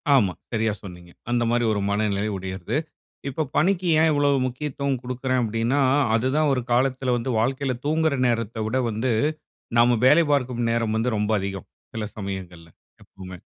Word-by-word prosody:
ஆமா. 100 -9 +3 0.2
சரியா 110 -2 0
சொன்னீங்க. 90 -2 -11 0.2
அந்த 120 -1 +2
மாரி 120 0 +2
ஒரு 100 - -1
மனநிலை 100 0 0
உடையது. 95 +8 -4 0.5
இப்போ 150 +4 -2
பணிக்கு 185 +1 +2
ஏன் 160 0 +4
இவ்வளோ 145 -1 +2 0.2
முக்கியத்துவம் 135 0 -2
குடுக்கிறேன் 130 0 -1
அப்படீன்னா, 115 +5 0 0.4
அது 115 +3 +1
தான் 155 -1 +3
ஒரு 125 - 0
காலத்தில 130 0 +1
வந்து 125 +2 -3
வாழ்க்கையில 130 +2 0
தூங்குற 160 -1 +1
நேரத்தை 115 -1 -1
விட 130 +4 0
வந்து, 115 +2 -1 0.7
நம்ம 120 0 +5
வேலை 155 +5 +6
பார்க்கும் 125 -4 0
நேரம் 115 -2 0
வந்து 115 +1 0
ரொம்ப 105 +1 0
அதிகம், 95 -1 -5 0.3
சில 110 -1 -3
சமயங்கள்ல 95 -4 -7 0.3
எப்பவுமே. 95 -1 -11
120 Hz, 155 wpm, -24 LUFS, 105-130 Hz, 0.7 s, வேலை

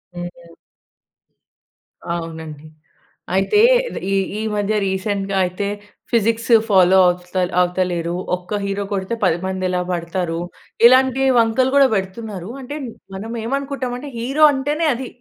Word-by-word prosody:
హ్మ్. 175 -1 -8 1.6
అవునండి. 160 -3 -6 0.7
అయితే 195 - +2 0.4
రీ 185 - -5
ఈ - - +1 0.3
ఈ - - -2
మధ్య 205 +1 0
రీసెంట్‌గా 195 +1 -2
అయితే 185 +3 -3 0.4
ఫిజిక్స్ 230 0 +1 0.2
ఫాలో 190 -1 +5
ఆవుత 180 +1 -3 0.3
అవుతలేరు. 175 -1 -1 0.2
ఒక్క 180 +3 -5
హీరో 200 0 -2
కొడితే 195 +3 -2
10 170 -2 +2
మంది 190 0 -2
ఎలా 180 0 0
పడతారు. 170 -1 -2 0.5
ఇలాంటి 260 +1 +5 0.2
వంకలు 230 +3 +2
కూడా 280 -1 +6
పెడుతున్నారు. 195 -1 -5
అంటే 285 +3 -6 0.4
మనం 215 +4 -6
ఏమనుకుంటాం 275 0 -3
అంటే 285 +2 -8
హీరో 275 +6 +3
అంటేనే 295 +4 -1
అది. 255 +1 -6
195 Hz, 120 wpm, -20 LUFS, 180-240 Hz, 1.6 s, కూడా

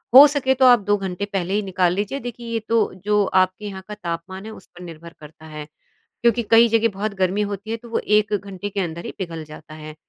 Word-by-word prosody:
हो 275 +2 +12
सके 280 -2 +1
तो 260 0 +3
आप 245 -2 +7
2 205 0 +2
घंटे 190 0 -4
पहले 190 -1 -1
ही 210 - +1
निकाल 185 -2 +1
लीजिए 205 +8 -2
देखिए 240 -2 -8
ये 225 - 0
तो 230 - +3 0.3
जो 210 -1 +3
आपके 185 +2 +1
यहाँ 195 -2 -6
का 210 - -7
तापमान 185 +1 -6
है 220 - -7
उस 205 - -13
पर 175 - -12
निर्भर 170 -1 -11
करता 155 +1 -14
है, 150 -1 -8 0.6
क्योंकि 235 0 +3
कई 230 +1 +7
जगह 230 0 +3
बहुत 205 +1 -3
गर्मी 190 +2 0
होती 205 +1 -5
है 225 - -1
तो 235 +1 -14
वो 230 - 0
1 210 0 +2
घंटे 200 0 -5
के 200 0 -3
अंदर 170 -2 -4
ही - - -6
पिघल 165 -4 -5
जाता 155 0 -12
है। 155 0 -9
200 Hz, 245 wpm, -22 LUFS, 175-220 Hz, 0.6 s, हो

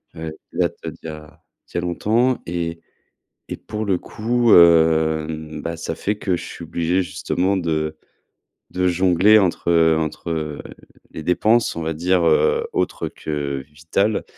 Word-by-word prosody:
heu, 80 0 -5 0.2
qui - - -11
date - - +1
d'il - - -7
y - - -6
a 75 -1 -11 0.2
d'il - - -21
y - - +1
a - - -2
longtemps 115 +8 +1
et 85 -1 -4 0.7
et - - -4
pour 105 0 -5
le 100 -3 +1
coup, 120 +2 0
heu, 80 -2 +5
mmh, 80 -1 -6
bah, 85 0 -4
ça 80 0 -4
fait 105 +5 -2
que 95 -4 0
je - - -7
suis 85 - -9
obligé 85 +3 0
justement 95 +2 -1
de 80 -3 -1 0.7
de 90 0 0
jongler 90 +4 +4
entre, 90 -2 -1
heu 80 -1 +4
entre, 80 +2 -4
heu, 75 -2 -3 0.5
les 80 - -7
dépenses 110 +6 +2
on 85 - -3
va 80 0 -2
dire, 90 +3 +1
heu, 465 - +3
autre 375 - -1
que 70 -3 -4
vitales 100 +8 -1
85 Hz, 170 wpm, -21 LUFS, 80-95 Hz, 0.7 s, heu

